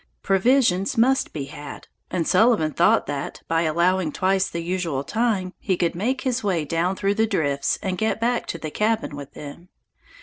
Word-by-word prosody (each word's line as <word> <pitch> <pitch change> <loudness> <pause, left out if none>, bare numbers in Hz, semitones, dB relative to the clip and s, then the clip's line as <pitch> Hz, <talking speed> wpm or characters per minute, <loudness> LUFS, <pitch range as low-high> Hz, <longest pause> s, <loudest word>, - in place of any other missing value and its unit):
Provisions 195 -1 +2
must 260 +4 +3
be 145 - -4
had, 145 +1 -9 0.2
and 170 -3 -1
Sullivan 220 -9 +3
thought - - +3
that, 140 -1 -5
by 165 0 +1
allowing 170 +1 +1
twice 190 +3 +1
the 170 0 -4
usual 170 -6 -2
time, 200 0 -1
he 185 - -1
could 170 -1 0
make 235 +9 -1
his 255 -2 -1
way 180 -6 0
down 170 +5 0
through 200 +1 0
the 220 +2 +1
drifts 145 -9 0
and 185 -2 -2
get 220 0 0
back 240 +1 0
to - - -4
the 155 -2 -6
cabin 215 -6 0
with 145 -1 -9
them. 150 +5 -10
185 Hz, 180 wpm, -23 LUFS, 160-220 Hz, 0.2 s, must